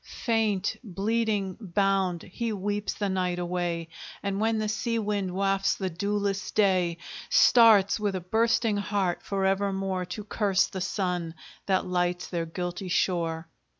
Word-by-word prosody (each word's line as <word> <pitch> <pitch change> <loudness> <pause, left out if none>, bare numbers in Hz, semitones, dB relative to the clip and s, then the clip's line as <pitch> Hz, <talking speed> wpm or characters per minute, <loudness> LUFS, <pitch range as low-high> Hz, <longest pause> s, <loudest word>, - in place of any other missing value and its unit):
Faint, 215 -4 0
bleeding, 205 -1 -1
bound, 195 -3 0
he 230 +5 -4
weeps 205 0 -2
the 205 - -1
night 185 -2 -1
away, 175 -1 -2 0.4
And 200 0 -1
when 225 0 +2
the 215 0 -1
sea 215 +2 -1
wind 205 -3 -1
wafts 195 +1 +1
the 190 -2 -3
dewless 200 +2 -1
day, 185 -5 +2 0.3
Starts, 220 -4 +6
with 205 -2 -1
a - - -1
bursting 225 +3 +1
heart, 200 -3 -1
for 195 -1 -2
evermore 195 -1 0
To 180 +4 -6
curse 200 -3 +1
the 190 - -6
sun 180 -3 -2 0.3
that 190 -1 +2
lights 180 -1 0
their 170 -2 -2
guilty 175 +2 -4
shore! 170 -2 0
195 Hz, 145 wpm, -27 LUFS, 180-210 Hz, 0.4 s, Starts